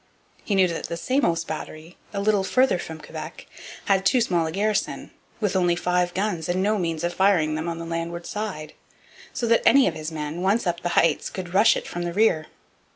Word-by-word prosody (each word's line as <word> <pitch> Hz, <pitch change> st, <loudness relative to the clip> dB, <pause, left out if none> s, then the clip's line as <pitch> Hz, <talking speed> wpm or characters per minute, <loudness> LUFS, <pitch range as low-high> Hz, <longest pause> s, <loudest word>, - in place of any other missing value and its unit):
He 205 Hz, -, -1 dB
knew 190 Hz, -1 st, +5 dB
that 170 Hz, -2 st, -4 dB
the 170 Hz, -, -4 dB
Samos 170 Hz, -, +1 dB
battery, 160 Hz, +1 st, -7 dB, 0.2 s
a 200 Hz, -, -3 dB
little 205 Hz, -1 st, +2 dB
farther 255 Hz, 0 st, +2 dB
from 160 Hz, -2 st, -7 dB
Quebec, -, -, -8 dB, 0.4 s
had 195 Hz, -2 st, +2 dB
too 250 Hz, +6 st, +3 dB
small 175 Hz, -8 st, +1 dB
a -, -, -4 dB
garrison, 205 Hz, +3 st, -1 dB, 0.3 s
with 205 Hz, -4 st, -1 dB
only 175 Hz, -2 st, +3 dB
five 180 Hz, 0 st, 0 dB
guns 190 Hz, -5 st, -2 dB
and 185 Hz, +2 st, +1 dB
no 210 Hz, +1 st, +1 dB
means 165 Hz, -3 st, -2 dB
of 175 Hz, 0 st, -1 dB
firing 180 Hz, -5 st, +3 dB
them 160 Hz, +2 st, -2 dB
on 165 Hz, -, -4 dB
the 165 Hz, -, -6 dB
landward 170 Hz, +1 st, -4 dB
side; 190 Hz, -8 st, -5 dB, 0.6 s
so 240 Hz, -, -3 dB
that 230 Hz, 0 st, +3 dB
any 275 Hz, -1 st, +6 dB
of 175 Hz, -, 0 dB
his 155 Hz, 0 st, -6 dB
men, 155 Hz, +2 st, -5 dB
once 200 Hz, +5 st, +1 dB
up 175 Hz, -1 st, -1 dB
the 175 Hz, -, -3 dB
heights, 165 Hz, -3 st, +3 dB
could 180 Hz, -2 st, -7 dB
rush 210 Hz, +3 st, +5 dB
it -, -, -6 dB
from 175 Hz, -, -5 dB
the 175 Hz, 0 st, -3 dB
rear. 175 Hz, -6 st, +2 dB
175 Hz, 215 wpm, -24 LUFS, 165-200 Hz, 0.6 s, any